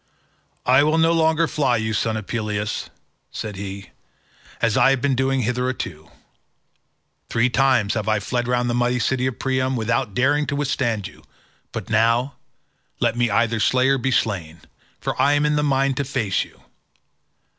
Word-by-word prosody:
"I 130 +2 +5
will 155 +2 +2
no 165 0 +4
longer 160 0 +2
fly 135 -7 +1
you, 110 0 -2
son 110 +1 0
of 110 - -6
Peleus," 105 -2 -3 0.4
said 105 -2 -6
he, 95 0 -7 0.7
"as 115 -2 +1
I 135 - +5
have 135 -1 +2
been 140 +1 +1
doing 135 +1 +1
hitherto. 120 -9 -3 1.2
Three 120 +2 +1
times 130 -6 +2
have 110 -2 -3
I 110 -1 +2
fled 120 +4 -2
round 125 0 +1
the 120 - 0
mighty 120 +1 +1
city 130 +2 0
of 130 - -4
Priam, 130 0 0
without 115 -1 -1
daring 145 +3 +2
to 145 - -2
withstand 125 -8 -1
you, - - -16 0.5
but 110 -1 -6
now, 115 +5 +2 0.7
let - - +1
me 120 -1 +1
either 115 +2 +1
slay 130 +4 +3
or 135 -1 +2
be 130 - -1
slain, 90 -10 -1 0.4
for - - -2
I 145 - +4
am 145 0 +2
in 150 0 +2
the 150 - +2
mind 135 -2 +1
to 140 - 0
face 125 -8 -1
you. - - -18
125 Hz, 175 wpm, -22 LUFS, 110-135 Hz, 1.2 s, I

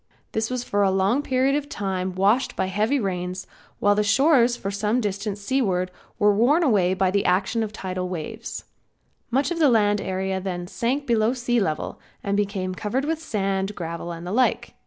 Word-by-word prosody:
This 220 0 -1
was 250 -1 -2
for 205 -4 0
a 195 - +4
long 195 +8 +2
period 265 -1 +1
of 290 -1 -2
time 190 -4 -3
washed 205 +7 +2
by - - 0
heavy 215 +9 +1
rains 185 -2 -3 0.3
while 205 - +3
the 210 - +2
shores 240 +3 +4
for 195 - -4
some 210 +4 0
distance 205 -1 -3
seaward 200 -6 0 0.3
were 205 0 +4
worn 265 - +3
away 190 - +3
by 185 0 +2
action 195 +5 +1
of 220 -2 -2
the 215 - -11
tidal 185 -1 -3
waves. 200 +7 -6 0.7
Much 270 +7 +1
of 340 - -2
the 300 -3 +5
land 205 -3 +3
area 190 0 -2
then 180 -2 -4
sank 255 +9 -2
below 230 -2 +2
sea 245 -1 +1
level, 160 -7 -2 0.2
and 200 0 0
became 200 -2 -1
covered 220 +8 -2
with 320 +1 -2
sand, 195 -5 -1
gravel 170 0 -5
and 170 0 -7
the 180 - -4
like. 250 +4 +1
205 Hz, 190 wpm, -24 LUFS, 190-240 Hz, 0.7 s, the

